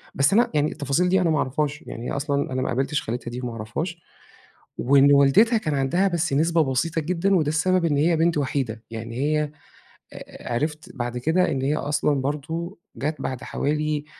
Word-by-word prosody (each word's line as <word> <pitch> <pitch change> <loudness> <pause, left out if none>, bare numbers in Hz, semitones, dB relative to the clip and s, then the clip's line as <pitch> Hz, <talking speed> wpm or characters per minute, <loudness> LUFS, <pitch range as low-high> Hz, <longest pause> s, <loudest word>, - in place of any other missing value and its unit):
بس 140 +7 +3
أنا 235 +3 +4
يعني 150 0 +1
التفاصيل 145 +6 0
دي 190 0 +3
أنا 170 - +2
ما 155 - +2
أعرفهاش، 145 +2 -1
يعني 120 +2 -6
أصلًا 140 -1 -1
أنا 130 - -1
ما - - -1
قابلتش 135 +4 0
خالتها 120 +1 -5
دي 125 - -5
وما 125 -2 -4
أعرفهاش، 155 - -5 0.8
وإن 140 +2 +5
والدتها 140 - +5
كان 155 -9 -2
عندها 140 +8 +1
بس 170 -5 -1
نسبة 165 +2 +3
بسيطة 160 +5 0
جدًا 180 +4 +1
وده 155 -4 +2
السبب 180 +2 +2
إن 145 -3 +1
هي 165 +3 +3
بنت 165 0 +2
وحيدة، 130 -5 -2
يعني 115 +1 -6
هي، 150 +1 0 0.9
عرِفت 150 +5 -3
بعد 120 -1 -3
كده 165 +6 +1
إن 135 - -1
هي 140 +3 +1
أصلًا 145 -1 0
برضو 160 +7 -4 0.2
جات 150 +3 -3
بعد 130 -2 -4
حوالي 150 0 -1
150 Hz, 180 wpm, -24 LUFS, 135-165 Hz, 0.9 s, وإن